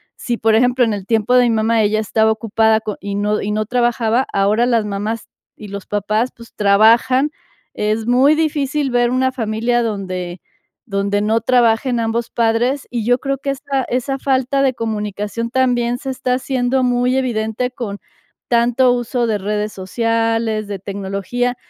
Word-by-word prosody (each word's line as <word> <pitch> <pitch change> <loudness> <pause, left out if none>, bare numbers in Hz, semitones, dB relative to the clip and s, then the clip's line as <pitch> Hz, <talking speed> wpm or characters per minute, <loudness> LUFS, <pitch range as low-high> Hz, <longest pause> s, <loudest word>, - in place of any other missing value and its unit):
si 240 -2 -3
por 225 0 +2
ejemplo, 250 +1 +3
en 220 - 0
el 195 -2 -5
tiempo 225 +1 +1
de 250 - +6
mi - - +2
mamá 225 0 +2
ella 215 +1 +1
estaba 220 +1 +2
ocupada 220 0 +2
co 210 -2 -5
y 200 0 -4
no 210 +1 0
y 210 - -2
no 215 0 -1
trabajaba, 240 +1 +1
ahora 210 +4 +2
las 230 -3 +2
mamás 210 +2 -4 0.3
y 210 -2 -10
los 200 -1 -7
papás, 215 +4 0
pues, 235 0 -15
trabajan, 230 +7 +4 0.4
es 215 +1 -1
muy 265 +5 +4
difícil 295 -3 0
ver 240 0 +2
una 260 0 +1
familia 235 0 0
donde 185 -4 -4 0.5
donde 200 +1 0
no 220 +2 +1
trabajen 240 0 +2
ambos 225 +1 -1
padres, 235 +4 0
y 235 -3 -2
yo 245 +1 +3
creo 275 -1 -2
que 275 -1 -2
esta 275 -1 -2
esa 255 +2 -1
falta 270 0 +1
de 260 -1 +2
comunicación 215 0 -3
también 245 -2 +1
se 270 - -5
está 255 -1 -1
haciendo 260 0 0
muy 245 +1 +1
evidente 235 -1 -1
con 205 -5 -6 0.5
tanto 245 +1 +3
uso 240 0 -1
de 215 -2 0
redes 210 +1 -2
sociales, 225 +2 -1
de 200 -2 -5
tecnología. 200 +6 -3
230 Hz, 170 wpm, -18 LUFS, 210-250 Hz, 0.5 s, de